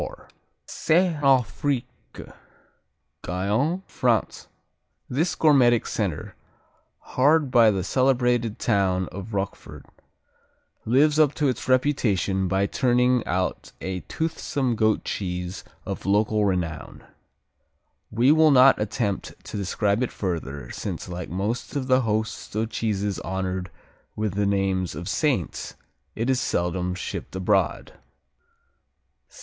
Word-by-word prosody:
Saint 165 Hz, 0 st, +1 dB
Affrique 135 Hz, 0 st, +2 dB, 1.4 s
Guyenne, 110 Hz, -, -1 dB
France 120 Hz, -4 st, -1 dB, 0.6 s
This 160 Hz, +7 st, 0 dB
gourmetic 125 Hz, -7 st, +4 dB
center, -, -, -3 dB, 0.8 s
hard 145 Hz, +1 st, +3 dB
by 115 Hz, -3 st, +6 dB
the 95 Hz, -3 st, 0 dB
celebrated 125 Hz, -1 st, +1 dB
town 95 Hz, -5 st, +1 dB
of 100 Hz, +3 st, -7 dB
Roquefort, 100 Hz, 0 st, -5 dB, 1.0 s
lives 145 Hz, +6 st, +3 dB
up 150 Hz, -2 st, +4 dB
to 150 Hz, -, +1 dB
its 130 Hz, 0 st, -3 dB
reputation 105 Hz, -8 st, +1 dB
by 95 Hz, +2 st, +1 dB
turning 125 Hz, +1 st, +2 dB
out 90 Hz, +2 st, -2 dB
a 95 Hz, 0 st, -4 dB
toothsome 145 Hz, -, -2 dB
goat 110 Hz, -1 st, +1 dB
cheese 90 Hz, -1 st, -4 dB, 0.2 s
of -, -, -5 dB
local 105 Hz, +1 st, +2 dB
renown. 85 Hz, -6 st, -3 dB, 1.1 s
We 120 Hz, +5 st, +3 dB
will 160 Hz, 0 st, +5 dB
not 135 Hz, -4 st, +6 dB
attempt 105 Hz, -1 st, -2 dB
to -, -, -8 dB
describe 100 Hz, +2 st, 0 dB
it 125 Hz, -, -1 dB
further, 75 Hz, -, -4 dB
since -, -, -5 dB
like 90 Hz, 0 st, -6 dB
most 100 Hz, -, -3 dB
of 140 Hz, -2 st, -1 dB
the 130 Hz, 0 st, +3 dB
host 110 Hz, -2 st, -2 dB
of 110 Hz, +1 st, -1 dB
cheeses 105 Hz, -3 st, -1 dB
honored 95 Hz, -1 st, -3 dB, 0.5 s
with 105 Hz, -3 st, -2 dB
the 100 Hz, 0 st, 0 dB
names 95 Hz, -4 st, 0 dB
of 85 Hz, +3 st, -6 dB
Saints, 125 Hz, -, -1 dB, 0.4 s
it 115 Hz, +2 st, -2 dB
is 130 Hz, -1 st, +2 dB
seldom 90 Hz, +1 st, -1 dB
shipped 90 Hz, -, -6 dB
abroad. 95 Hz, +1 st, 0 dB
110 Hz, 115 wpm, -24 LUFS, 95-130 Hz, 1.4 s, by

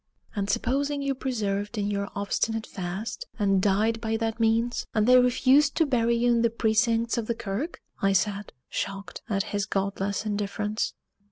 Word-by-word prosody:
"And 200 Hz, -1 st, -1 dB
supposing 280 Hz, +5 st, 0 dB
you 275 Hz, 0 st, 0 dB
persevered 215 Hz, -5 st, -2 dB
in 205 Hz, 0 st, 0 dB
your 200 Hz, 0 st, -2 dB
obstinate 220 Hz, +2 st, -1 dB
fast, 195 Hz, -, -5 dB
and 195 Hz, -3 st, +2 dB
died 215 Hz, +3 st, +2 dB
by 225 Hz, -1 st, 0 dB
that 225 Hz, 0 st, -2 dB
means, 230 Hz, +2 st, +1 dB
and 215 Hz, -1 st, +3 dB
they 250 Hz, +1 st, +7 dB
refused 260 Hz, +4 st, +4 dB
to 325 Hz, -, +3 dB
bury 235 Hz, -4 st, +2 dB
you 240 Hz, +1 st, +3 dB
in 235 Hz, -1 st, +3 dB
the 235 Hz, -, +3 dB
precincts 230 Hz, +1 st, +1 dB
of 220 Hz, -, -4 dB
the 235 Hz, -, 0 dB
kirk?" 235 Hz, -, -4 dB, 0.2 s
I 195 Hz, 0 st, +3 dB
said, 200 Hz, +1 st, 0 dB, 0.2 s
shocked 195 Hz, 0 st, -5 dB
at 195 Hz, -2 st, +1 dB
his 205 Hz, -2 st, -2 dB
godless 200 Hz, +1 st, -1 dB
indifference. 210 Hz, 0 st, -2 dB
220 Hz, 170 wpm, -27 LUFS, 200-235 Hz, 0.2 s, they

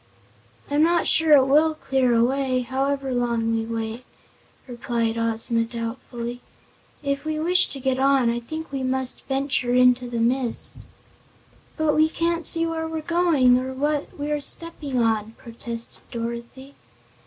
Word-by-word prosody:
"I'm 290 Hz, +1 st, +3 dB
not 340 Hz, +1 st, +3 dB
sure 320 Hz, -1 st, +4 dB
it 270 Hz, -3 st, +7 dB
will 310 Hz, +3 st, +3 dB
clear 265 Hz, -5 st, +1 dB
away, 255 Hz, +2 st, +1 dB
however 270 Hz, +1 st, -1 dB
long 235 Hz, -2 st, 0 dB
we 225 Hz, 0 st, -1 dB
wait," 225 Hz, +1 st, -4 dB, 0.6 s
replied 235 Hz, -2 st, -2 dB
Ozma, 230 Hz, 0 st, 0 dB
doubtfully. 235 Hz, +1 st, -6 dB, 0.6 s
"If 280 Hz, 0 st, -1 dB
we 310 Hz, 0 st, -2 dB
wish 360 Hz, +3 st, +4 dB
to 275 Hz, -, -8 dB
get 260 Hz, 0 st, 0 dB
on, 270 Hz, -2 st, +3 dB
I 235 Hz, 0 st, 0 dB
think 315 Hz, +7 st, -7 dB
we 270 Hz, -1 st, -3 dB
must 260 Hz, 0 st, -2 dB
venture 270 Hz, -2 st, 0 dB
into 250 Hz, 0 st, +4 dB
the 235 Hz, -1 st, -3 dB
mist." 240 Hz, +1 st, -1 dB, 1.0 s
"But 315 Hz, -2 st, +2 dB
we 310 Hz, +1 st, +4 dB
can't 335 Hz, +1 st, -1 dB
see 330 Hz, 0 st, +2 dB
where 325 Hz, -1 st, -2 dB
we're 320 Hz, -1 st, -4 dB
going, 310 Hz, -7 st, +3 dB
or 260 Hz, +1 st, -5 dB
what 295 Hz, +2 st, -2 dB
we're 295 Hz, 0 st, -2 dB
stepping 290 Hz, -2 st, -4 dB
on," 225 Hz, -2 st, +1 dB
protested 235 Hz, 0 st, -6 dB
Dorothy. 235 Hz, +4 st, -6 dB
260 Hz, 145 wpm, -23 LUFS, 235-295 Hz, 1.0 s, it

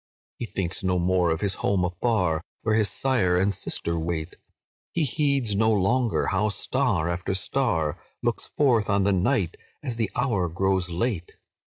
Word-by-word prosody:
"He 120 Hz, -, -3 dB
thinks 95 Hz, -3 st, -3 dB
no 90 Hz, -1 st, +1 dB
more 90 Hz, 0 st, +2 dB
of 80 Hz, 0 st, -1 dB
his 100 Hz, -2 st, +2 dB
home 95 Hz, -2 st, +2 dB
afar, 90 Hz, -3 st, 0 dB, 0.2 s
Where 110 Hz, -, +1 dB
his 110 Hz, -2 st, +3 dB
sire 95 Hz, -5 st, +1 dB
and 95 Hz, +2 st, +2 dB
sister 85 Hz, -3 st, -2 dB
wait; 80 Hz, 0 st, -3 dB, 0.6 s
He 170 Hz, -, +1 dB
heeds 140 Hz, -6 st, +1 dB
no 110 Hz, +2 st, +3 dB
longer 115 Hz, +4 st, +2 dB
how 100 Hz, +3 st, +1 dB
star 105 Hz, -, 0 dB
after 85 Hz, +2 st, -2 dB
star 95 Hz, -, 0 dB, 0.2 s
Looks -, -, -1 dB
forth 120 Hz, -8 st, +2 dB
on 100 Hz, -1 st, +3 dB
the 100 Hz, 0 st, +3 dB
night, 95 Hz, -1 st, +1 dB, 0.3 s
as 125 Hz, -5 st, -3 dB
the 110 Hz, -4 st, 0 dB
hour 115 Hz, -9 st, +1 dB
grows 95 Hz, +1 st, 0 dB
late. 90 Hz, 0 st, -2 dB
95 Hz, 165 wpm, -25 LUFS, 90-115 Hz, 0.6 s, his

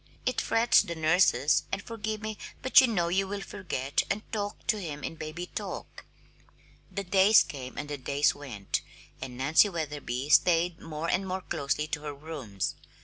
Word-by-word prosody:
It 255 Hz, -, +1 dB
frets 230 Hz, +1 st, +4 dB
the 170 Hz, -, -5 dB
nurses 155 Hz, -4 st, +3 dB
and -, -, -1 dB
forgive 215 Hz, -1 st, -5 dB
me 215 Hz, -1 st, -5 dB, 0.2 s
but 260 Hz, +2 st, +8 dB
you 260 Hz, -, +3 dB
know 175 Hz, -7 st, 0 dB
you 190 Hz, +2 st, +1 dB
will 200 Hz, +1 st, -4 dB
forget 175 Hz, -9 st, -2 dB
and 205 Hz, +2 st, -1 dB
talk 205 Hz, -2 st, -4 dB
to 215 Hz, -, +1 dB
him 150 Hz, -4 st, -6 dB
in -, -, -3 dB
'baby 155 Hz, +3 st, -6 dB
talk'!" -, -, -7 dB, 0.9 s
The 200 Hz, -, -3 dB
days 195 Hz, +3 st, +6 dB
came 130 Hz, -3 st, -8 dB
and 150 Hz, -, -4 dB
the 145 Hz, -1 st, -5 dB
days 140 Hz, +2 st, +2 dB
went, 120 Hz, -9 st, -4 dB, 0.4 s
and 130 Hz, -2 st, -6 dB
Nancy 150 Hz, +10 st, +4 dB
Wetherby 145 Hz, -6 st, -4 dB
stayed 170 Hz, +2 st, +4 dB
more 160 Hz, 0 st, -5 dB
and 190 Hz, +2 st, 0 dB
more 190 Hz, +1 st, -2 dB
closely 145 Hz, -2 st, -2 dB
to 145 Hz, -, -3 dB
her 150 Hz, -1 st, -6 dB
rooms. 140 Hz, -, -4 dB
165 Hz, 175 wpm, -29 LUFS, 145-200 Hz, 0.9 s, but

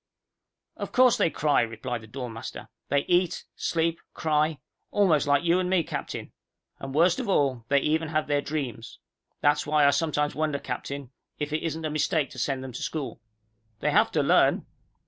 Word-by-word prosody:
"Of -, -, -5 dB
course 250 Hz, -2 st, +5 dB
they -, -, +3 dB
cry," 150 Hz, -2 st, +2 dB
replied 115 Hz, +1 st, -3 dB
the 110 Hz, -, -13 dB
dorm 125 Hz, 0 st, -6 dB
master. 115 Hz, -, -8 dB, 0.2 s
"They 140 Hz, -, +3 dB
eat, 175 Hz, -1 st, +1 dB
sleep, 165 Hz, 0 st, 0 dB, 0.2 s
cry 155 Hz, 0 st, +1 dB, 0.3 s
almost 165 Hz, -8 st, +3 dB
like 145 Hz, +1 st, +3 dB
you 170 Hz, +1 st, +3 dB
and 180 Hz, -1 st, -1 dB
me, 185 Hz, -3 st, +3 dB
Captain. -, -, -5 dB, 0.5 s
And 135 Hz, 0 st, -6 dB
worst 170 Hz, -, +4 dB
of 245 Hz, -5 st, -3 dB
all, 135 Hz, -10 st, +1 dB
they 140 Hz, +1 st, +3 dB
even 160 Hz, +2 st, +1 dB
have 155 Hz, 0 st, 0 dB
their 145 Hz, -1 st, +1 dB
dreams. 135 Hz, -7 st, -5 dB, 0.4 s
That's 145 Hz, 0 st, +2 dB
why 150 Hz, -1 st, +4 dB
I 140 Hz, -, +6 dB
sometimes 150 Hz, 0 st, 0 dB
wonder, 155 Hz, -2 st, 0 dB
Captain, 140 Hz, -1 st, -5 dB, 0.3 s
if 150 Hz, 0 st, -3 dB
it 155 Hz, -, 0 dB
isn't 160 Hz, -1 st, -3 dB
a 155 Hz, -, -2 dB
mistake 155 Hz, 0 st, 0 dB
to -, -, -8 dB
send 135 Hz, -2 st, -1 dB
them 130 Hz, -, -6 dB
to -, -, -6 dB
school." 135 Hz, -8 st, -4 dB, 0.6 s
"They -, -, +1 dB
have -, -, +4 dB
to -, -, +2 dB
learn." -, -, +4 dB
150 Hz, 185 wpm, -27 LUFS, 140-160 Hz, 0.6 s, I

